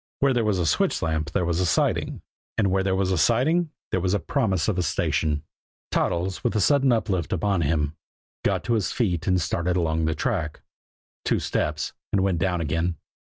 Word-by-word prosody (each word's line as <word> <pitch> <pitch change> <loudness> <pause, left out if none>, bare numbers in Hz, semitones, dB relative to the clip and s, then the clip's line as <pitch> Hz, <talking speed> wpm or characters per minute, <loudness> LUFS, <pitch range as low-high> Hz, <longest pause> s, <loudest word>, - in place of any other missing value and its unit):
Where 135 -1 +3
there 120 -2 +1
was 105 -3 +1
a 90 - 0
switch 75 - +1
lamp 80 -1 -1
there 90 +2 0
was 85 0 0
a 90 - +2
siding, 80 - 0 0.3
and 100 -4 +2
where 95 0 +2
there 95 0 +1
was 95 -1 +1
a 90 - +1
siding 155 - +3 0.2
there 95 - +1
was 95 +3 +2
promise 100 - +1
of 95 -4 0
a - - +3
station. 75 -2 0 0.5
Toddles, 90 +2 0
with 120 - +1
the 110 - +1
sudden 135 +4 +4
uplift 100 -7 0
upon 95 0 +1
him, 75 -1 0 0.5
got - - +1
to 120 - 0
his 110 -4 0
feet 90 -9 -1
and 90 -1 +3
started 85 +2 0
along 80 -2 +1
the 80 0 0
track 80 -6 -2 0.6
two - - +2
steps 75 0 -1 0.2
and 95 -2 +2
went 95 -4 +1
down 90 -2 0
again. 80 +3 0
90 Hz, 200 wpm, -25 LUFS, 80-105 Hz, 0.6 s, sudden